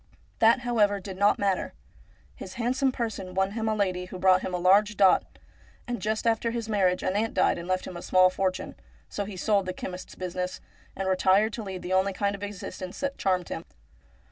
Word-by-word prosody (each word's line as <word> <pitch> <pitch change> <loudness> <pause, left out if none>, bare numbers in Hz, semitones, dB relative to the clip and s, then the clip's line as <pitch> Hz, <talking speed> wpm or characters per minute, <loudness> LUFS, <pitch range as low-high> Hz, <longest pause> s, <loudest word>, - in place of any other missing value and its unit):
That, 230 +3 +5
however, 215 -5 +2
did 190 0 -7
not 200 +2 +3
matter. 195 -2 -1 0.6
His 185 - -9
handsome 255 +3 +1
person 220 -7 -4
won 190 +1 +1
him 220 +1 -2
a 215 - +1
lady 185 -3 -1
who 185 0 -8
brought 185 0 +4
him - - -4
a 180 - -1
large 200 +3 +4
dot; 195 -2 +3 0.5
and 245 -1 -3
just 215 +1 -1
after 230 0 +2
his 230 -1 -3
marriage 190 -4 +1
an 185 - 0
aunt 225 +2 -1
died - - +2
and 170 - -7
left 185 0 -1
him 180 - -8
a 175 - -6
small 185 0 +4
fortune, 185 0 -2 0.4
so 205 - -3
he 195 -2 -8
sold 200 0 +1
the 185 - -2
chemist's 180 0 -7
business, 180 0 -4 0.4
and 195 - -3
retired 190 +3 +3
to 230 - -4
lead 190 -3 -6
the 180 +1 -3
only 190 +1 +2
kind 200 +2 0
of 200 - -8
exist 205 -2 -7
ence 185 0 -6
that 280 0 -3
charmed 185 -2 0
him. 165 - -5
195 Hz, 215 wpm, -27 LUFS, 185-215 Hz, 0.6 s, That